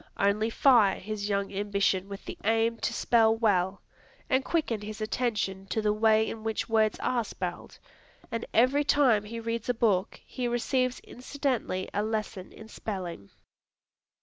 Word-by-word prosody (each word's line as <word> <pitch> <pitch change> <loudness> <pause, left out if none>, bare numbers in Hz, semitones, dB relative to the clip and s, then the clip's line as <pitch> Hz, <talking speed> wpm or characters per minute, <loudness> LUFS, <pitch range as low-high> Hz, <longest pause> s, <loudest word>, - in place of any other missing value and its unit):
Only 205 +3 +2
fire 230 -5 +4
his 210 +1 -4
young 200 0 -1
ambition 200 -1 0
with 200 0 -8
the - - -6
aim 225 +1 +2
to - - -2
spell 225 -2 +3
well, 195 -4 +1 0.5
and 260 +1 +3
quicken 270 -11 -1
his 210 +1 -7
attention 215 -4 -2
to 210 - -1
the 210 -1 +1
way 220 0 +3
in 220 -1 -6
which 220 -1 -2
words 220 -2 +2
are 240 -2 +1
spelled, - - -6 0.5
and 230 0 -3
every 255 +5 +3
time 260 -8 +3
he 230 +2 -6
reads 230 +1 -4
a 245 - +2
book 210 -4 +1
he 250 -2 -3
receives 255 +1 0
incidentally 250 -7 -3
a 205 - 0
lesson 215 -3 -3
in 220 - -12
spelling. 180 - -6
220 Hz, 155 wpm, -28 LUFS, 200-235 Hz, 0.5 s, fire